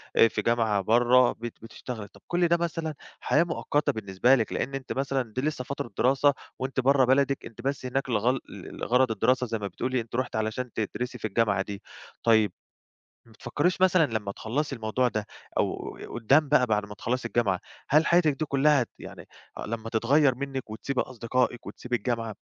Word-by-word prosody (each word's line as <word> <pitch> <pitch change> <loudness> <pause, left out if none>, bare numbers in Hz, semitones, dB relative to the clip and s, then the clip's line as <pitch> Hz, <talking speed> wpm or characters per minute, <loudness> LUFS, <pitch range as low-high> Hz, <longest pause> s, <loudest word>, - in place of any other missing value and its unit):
آآ، 115 - +7
في 110 - -2
جامعة 110 -3 +1
برا 120 +4 +4
بت 120 -1 -8
بتشتغلي. 115 -1 -7
طب - - -20
كل 175 0 +2
ده 170 0 +3
مثلًا 165 -2 -2 0.3
حياة 155 - +3
مؤقتة 150 -3 0
بالنسبة 110 +4 +2
لِك 115 -4 -1
لإن 135 - -2
أنتِ 135 -1 -5
مثلًا 135 -4 -2
دي 130 - -2
لسه 150 -2 -2
فترة 130 -2 -5
دراسة 135 +3 +4 0.3
وأنتِ 130 +1 -2
برا 135 0 +4
بلدِك، 135 +1 +2
أنتِ 115 0 -10
بس 135 +1 -2
هناك 130 +1 -2
لغل 120 +3 +1
ل - - -10
لغَرَض 125 0 +2
الدراسة 125 +4 +1
زي 115 0 -2
ما 100 - -3
بتقولي 130 +4 -2
أنتَ 115 0 -9
رُحتِ 130 0 -2
علشان 110 +3 -2
تدرسي 125 +3 -3
في 110 - -3
الجامعة 105 -2 +1
دي. 100 0 -6 0.4
طيب 110 -4 +4 0.8
ما 115 - -19
بتفكّريش 145 - -1
مثلًا 185 -4 +5
لما 105 -3 -2
تخلّصي 135 +8 -2
الموضوع 115 +3 0
ده، 110 -2 -3 0.3
أو - - -2
ي - - -7
قدام 135 +6 +2
بقى 135 -3 +4
بعد 105 -3 0
ما 105 - -9
تخلّصي 120 +3 -2
الجامعة، 105 -7 +1 0.3
هل 155 +3 +5
حياتِك 170 -3 +4
دي - - 0
كلها 140 -1 +3
ت 120 - -6
يعني - - -10 0.4
لما 115 0 -4
تتغيّر 130 +4 +3
منِّك 135 -3 -5
وتسيبي 125 +4 -2
أصدقائِك 125 0 -1
وتسيبي 125 0 -3
الجامعة 115 -1 -2
125 Hz, 185 wpm, -27 LUFS, 110-135 Hz, 0.8 s, آآ